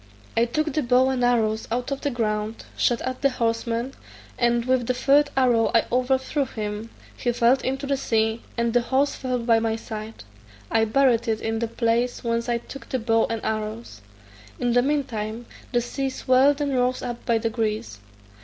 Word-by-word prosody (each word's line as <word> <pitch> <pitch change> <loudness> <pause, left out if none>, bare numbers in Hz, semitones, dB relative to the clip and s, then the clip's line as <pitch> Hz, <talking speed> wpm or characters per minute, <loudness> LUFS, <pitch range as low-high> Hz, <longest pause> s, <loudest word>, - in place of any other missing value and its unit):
I 230 - +4
took 310 +5 -1
the 305 - +1
bow 255 0 +3
and 255 -2 -1
arrows 220 -3 +1
out 245 +3 -2
of 275 - -3
the 290 - 0
ground, 215 -3 -2
shot 240 - +1
at 255 0 -4
the 275 - +4
horseman, 235 +1 -1 0.4
and 240 -1 +1
with 255 -2 +1
the 255 - +1
third 285 +3 +4
arrow 240 -4 +3
I 230 - +4
overthrew 265 +3 +1
him; 215 -1 -5 0.3
he 245 - -1
fell 240 +2 +3
into 270 +2 -2
the 275 0 0
sea, 225 -3 0 0.2
and 235 -1 0
the 245 - +4
horse 270 +4 +1
fell 255 -1 -2
by 230 -1 +3
my 225 0 0
side; 220 - -7 0.5
I 225 - +3
buried 240 0 +3
it 220 -1 0
in 225 0 -2
the 230 - -1
place 230 +2 0
whence 230 0 -1
I 240 - +2
took 275 +3 -10
the 260 - 0
bow 225 -1 +2
and 225 -1 -4
arrows. 215 - -4 0.6
In 245 -1 +1
the 245 - +5
mean 285 +2 +1
time, 220 -1 -5 0.3
the 240 -2 +2
sea 270 +3 -2
swelled 265 +2 +3
and 285 -1 0
rose 250 0 +1
up 240 -1 -5
by 235 - +3
degrees. 220 - -2
240 Hz, 190 wpm, -24 LUFS, 225-260 Hz, 0.6 s, the